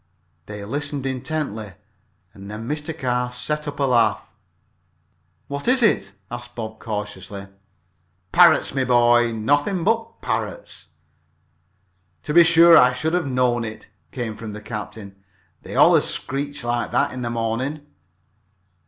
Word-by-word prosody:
They 105 -1 -7
listened 145 +3 -4
intently, 130 -6 -4 0.6
and 100 0 -11
then 110 +2 -7
Mr. 150 +2 -3
Carr 125 -2 -1
set 150 +5 -3
up 145 0 -6
a - - +1
laugh. 115 -6 +2 1.2
"What 140 +5 -5
is 250 0 +4
it?" 210 - +2 0.2
asked 120 0 -8
Bob, 110 -2 -7
curiously. 105 -2 -6 0.9
"Parrots, 170 -6 +5
my 135 -1 0
boy, 120 -1 +4
nothing 145 - 0
but 225 +3 -1
parrots." - - -4 1.4
"To 150 - -3
be 170 +1 +8
sure 170 0 +7
I 125 -4 +6
should 155 +6 -2
have 175 -4 0
knowed 125 -2 +1
it," 110 -2 -8 0.2
came 115 -4 -4
from 110 -1 -8
the 105 - -8
captain. 105 -3 -8 0.4
"They - - -8
allers - - +5
screech 140 0 -3
like 120 0 -1
that 140 0 +2
in 130 - -6
the 120 - -2
morning." 120 +6 -3
125 Hz, 135 wpm, -22 LUFS, 110-145 Hz, 1.4 s, be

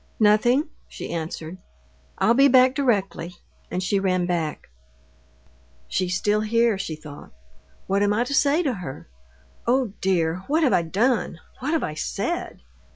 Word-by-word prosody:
"Nothing," 225 +7 +4 0.2
she - - -8
answered. 165 +1 -5 0.6
"I'll 230 - +3
be 275 +3 +6
back 255 -1 +5
directly," 200 -9 -1 0.3
and 180 +1 -2
she 195 +2 +1
ran 185 -2 +1
back. 170 -4 -2 1.2
"She's 180 -1 -1
still 210 +1 +1
here," 230 +1 +2
she 165 -4 -4
thought. 150 -2 -12 0.5
"What 200 +1 0
am 205 0 +3
I 220 +3 +2
to 250 - -4
say 285 +5 +3
to 275 -5 0
her? 175 - -8 0.6
Oh, 245 -4 +1
dear! 170 -3 +1
what 315 +3 +2
have 270 - +3
I - - +4
done, 200 +2 0 0.2
what 285 +5 -2
have 325 - +1
I 155 - -3
said? 205 - -4
205 Hz, 155 wpm, -24 LUFS, 180-255 Hz, 1.2 s, be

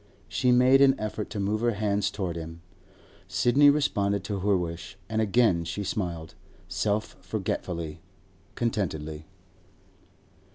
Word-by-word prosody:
She 125 - +1
made 130 +2 +6
an 135 -1 +5
effort 110 0 -4
to 105 - -5
move 105 +2 0
her 120 0 +2
hand 100 -1 0
towards 95 -5 -3
him. 80 +1 -9 0.6
Sidney 140 +4 +4
responded 100 -9 +1
to 100 -1 -3
her 100 0 +2
wish, 85 +1 -5
and 110 +1 0
again 110 -5 +3
she 100 +5 -4
smiled, 85 -5 -3 0.3
self 105 +1 -1
forgetfully, 85 -2 -4 0.5
contentedly. 80 -9 -2
100 Hz, 125 wpm, -27 LUFS, 85-115 Hz, 0.6 s, made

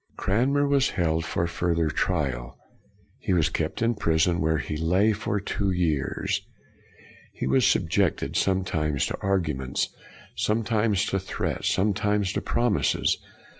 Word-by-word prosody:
Cranmer 135 +8 +1
was 140 -1 +3
held 80 -3 0
for 85 +1 -1
further 85 -2 0
trial. 65 -11 -2 0.6
He - - -1
was 80 -3 +3
kept 80 +7 -2
in 115 +1 +3
prison, 85 -3 +1
where 80 0 +2
he 75 +2 -4
lay 90 +7 +2
for 105 0 -2
two 100 0 -2
years. 85 -7 0 0.9
He - - -5
was 130 -2 +3
subjected, 90 +1 +1
sometimes 80 -7 0
to - - -5
arguments, 75 -10 -1 0.5
sometimes 110 -2 +1
to 95 - -1
threats, 95 - -2
some 100 +2 +2
times 105 -1 0
to - - -1
promises. 120 -3 +1
95 Hz, 130 wpm, -26 LUFS, 80-105 Hz, 0.9 s, was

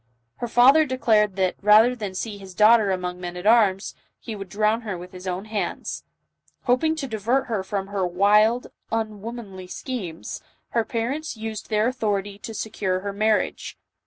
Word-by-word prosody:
Her 240 - -3
father 260 +7 +6
declared 220 -7 +2
that, 190 -2 0
rather 215 +4 +6
than 205 -5 -5
see 205 +1 -4
his 190 -2 -11
daughter 215 +1 +6
among 180 -1 -3
men 175 0 -5
at 180 - -7
arms, 210 -4 +3 0.3
he 225 - -6
would 195 -2 -8
drown 215 +4 +1
her 205 -5 -4
with 180 +1 -10
his 185 0 -9
own 185 +2 -3
hands. 215 -1 -4 0.6
Hoping 275 +6 +2
to 295 -4 -4
divert 235 +4 0
her 220 -5 -2
from 195 0 -3
her 200 -1 -2
wild, 210 +6 +3 0.3
unwomanly 215 -3 -5
schemes, 185 -7 -6 0.3
her 230 - +1
parents 250 +6 -3
used 220 -1 -6
their 215 0 +2
authority 205 -5 -2
to 225 - -7
secure 195 -4 -2
her 200 0 -4
marriage. 215 +1 0
210 Hz, 165 wpm, -24 LUFS, 195-230 Hz, 0.6 s, father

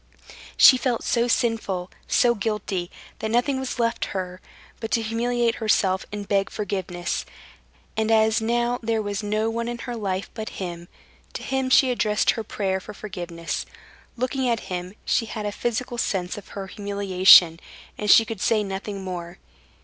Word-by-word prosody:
She 260 - +9
felt 245 -3 -1
so 235 0 +1
sinful, 220 -7 0 0.2
so 240 -1 +4
guilty, 205 -5 -2 0.3
that 220 - -2
nothing 250 +4 +1
was 265 -1 -4
left 230 -1 0
her 185 0 -5 0.4
but 225 - -4
to 230 - +3
humiliate 235 +1 0
herself 190 -3 +2
and 205 -1 -5
beg 195 -1 +1
forgiveness; 185 -4 -3 0.7
and 220 0 0
as 220 0 +4
now 240 +2 0
there 225 -1 0
was 205 0 -3
no 215 +1 0
one 230 +1 -2
in 240 0 -3
her 240 +1 -6
life 195 -3 -3
but 220 -1 -5
him, 175 -2 -6 0.5
to - - -6
him 265 -1 -1
she 260 0 +5
addressed 210 -3 +2
her 225 - -4
prayer 190 -3 -2
for 210 +2 -10
forgiveness. 175 -5 -5 0.5
Looking 255 +1 -1
at 235 -1 0
him, 180 +2 -4
she 230 - +1
had 215 -1 -5
a 205 - -1
physical 240 +2 -3
sense 180 -5 -1
of 205 - -10
her 195 - -4
humiliation, 190 -4 +5 0.4
and 210 - -3
she 225 - +8
could 220 -4 -6
say 215 -2 +2
nothing 195 0 -5
more. 175 -1 -6
215 Hz, 165 wpm, -24 LUFS, 190-235 Hz, 0.7 s, She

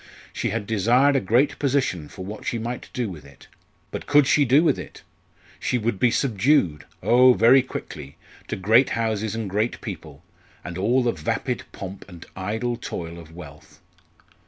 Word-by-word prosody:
She - - -2
had 110 0 -3
desired 120 +7 +3
a - - +4
great 120 +8 +1
position 125 - 0
for 95 - -9
what 105 +2 -8
she 120 - -2
might 120 +2 -5
do 125 -2 -2
with 85 -7 -9
it. 70 -1 -17 0.4
But - - -6
could 145 0 +5
she 145 +1 +3
do 135 +6 +4
with 170 - +2
it! - - -10 0.6
She 125 - 0
would 110 -4 -2
be 125 - +4
subdued 115 - +1 0.2
oh! 125 +1 +6
very 130 +4 +6
quickly! 75 - -8 0.3
to - - -3
great 110 +7 +4
houses 110 -1 -1
and 115 -2 -3
great 105 +5 -1
people, 80 - -9 0.4
and 90 - -7
all 115 +8 +2
the 120 - +2
vapid 75 -6 -3
pomp 95 0 -9
and 85 -1 -11
idle 110 +6 -3
toil 85 -7 -6
of 80 -1 -14
wealth. 90 - -13
110 Hz, 175 wpm, -23 LUFS, 90-125 Hz, 0.6 s, oh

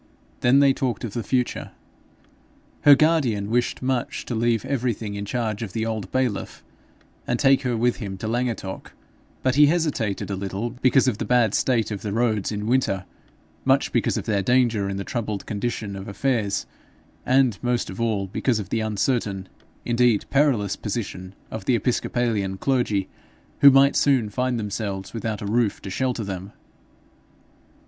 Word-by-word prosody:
Then 130 +3 +4
they 140 -1 +5
talked 130 -2 -2
of 110 -4 -4
the 120 - -2
future. 125 +2 -2 1.1
Her 145 -1 +10
guardian 130 -10 +1
wished 120 +2 0
much 130 -2 -2
to - - -4
leave 115 0 +1
everything 120 -6 -2
in 100 0 -4
charge 110 -1 -2
of 105 -5 -5
the 110 0 -1
old 110 -3 -4
bailiff, 130 -6 -2 0.6
and 120 - +1
take 135 -1 +4
her 125 -3 -1
with 120 +1 +1
him 100 -5 -5
to 110 - -5
Llangattock; 115 -5 -3 0.5
but 130 - +2
he 145 +2 +6
hesitated 145 - -1
a - - -1
little 100 +4 -3
because 130 +2 +3
of 115 -4 0
the - - -1
bad 120 -2 +3
state 115 -4 +1
of 100 - -4
the 105 - -4
roads 110 -2 0
in 105 0 -3
winter, 110 -6 +1 0.6
much - - +2
because - - +1
of - - -4
their 100 -2 +1
danger 115 -2 +2
in 100 - -3
the 100 - -3
troubled 105 -3 -4
condition 105 -1 -3
of 95 0 -7
affairs, 110 -2 -1 0.6
and 130 -4 +3
most 120 -1 0
of 95 - -6
all 110 -4 0
because 115 +5 0
of 100 -3 -5
the 115 - 0
uncertain, 105 -2 -1 0.4
indeed 120 -2 +2
perilous 130 -9 +2
position 95 -3 -5 0.2
of 110 - -6
the 125 - +3
Episcopalian 115 -5 -1
clergy, 110 -5 0 0.5
who 140 - +9
might 135 +1 +5
soon 130 -7 +2
find 125 +2 -1
themselves 100 -2 -4
without 110 -2 -3
a - - -4
roof 110 0 +1
to 95 - -8
shelter 125 0 -1
them. 95 0 -6
115 Hz, 170 wpm, -24 LUFS, 100-125 Hz, 1.1 s, Her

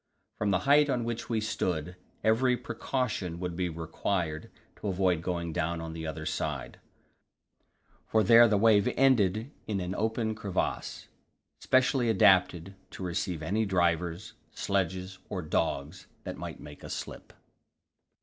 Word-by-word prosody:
From 105 - +1
the 95 -2 +2
height 145 +1 +5
on 125 -3 0
which 115 0 -4
we 115 -2 +1
stood, 90 -5 -2 0.3
every 125 +3 +3
precaution 110 -14 -3
would 90 -1 -4
be 90 0 -1
required 80 0 -3 0.3
to - - -5
avoid 90 -3 +1
going 85 -2 -3
down 85 0 -1
on 80 0 -6
the 80 0 -5
other 80 0 -5
side; 70 -6 -3 1.3
for 110 -1 +3
there 115 +4 +8
the 105 -2 +2
wave 105 -1 +4
ended 115 -2 +3 0.2
in 105 -3 -1
an 90 0 -3
open 110 +1 -1
crevasse, 105 -3 -3 0.5
specially 130 -1 +2
adapted 95 -3 +4 0.2
to - - -8
receive 85 -2 -2
any 105 +7 0
drivers, 85 -2 0 0.2
sledges 95 -1 -2
or 95 -4 -3
dogs 80 +3 -2 0.2
that - - -5
might - - -7
make 75 0 -12
a - - -8
slip. - - -7
95 Hz, 140 wpm, -29 LUFS, 85-110 Hz, 1.3 s, there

